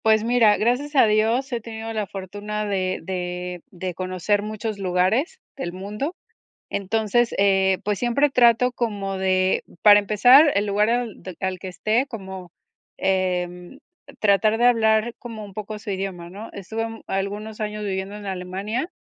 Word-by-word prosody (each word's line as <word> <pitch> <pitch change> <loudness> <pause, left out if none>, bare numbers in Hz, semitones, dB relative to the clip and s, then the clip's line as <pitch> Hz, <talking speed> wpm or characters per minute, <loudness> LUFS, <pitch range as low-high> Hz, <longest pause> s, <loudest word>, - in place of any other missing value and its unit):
Pues 220 -1 +4
mira, 230 -3 +4
gracias 255 +6 0
a 265 - +7
Dios 225 +5 +1
he 235 - -2
tenido 225 0 -6
la 215 -2 -2
fortuna 205 +3 -5
de 190 -2 -1
de 180 0 -4
de 185 0 -5
conocer 185 +3 -1
muchos 215 0 -4
lugares 195 - +1 0.2
del 175 -10 -5
mundo. 210 - -4 0.6
Entonces, 220 +4 0
eh, 190 -1 +3
pues, 210 -1 0
siempre 265 +4 +2
trato 245 -1 +4
como 205 -5 -3
de 185 0 +1 0.2
para 205 -1 +9
empezar, 245 +9 +6
el 205 +1 +1
lugar 205 +1 +2
al 240 -2 -2
de 185 -3 -9
al 190 -1 -2
que 190 - -9
esté 215 +7 0
como, 190 - -8 0.4
em, 180 +3 -1 0.4
tratar 215 +1 +3
de 240 +2 +3
hablar 225 -1 +3
como 225 -3 -8
un 200 - -11
poco 210 +1 -6
su 210 - -6
idioma, 190 -3 -4
¿no? 205 +5 -8
Estuve, 220 +3 -4
um, 225 0 -9
algunos 205 +3 -3
años 210 0 -3
viviendo 195 0 -3
en 210 -1 -8
Alemania, 195 - -3
210 Hz, 160 wpm, -23 LUFS, 190-225 Hz, 0.6 s, para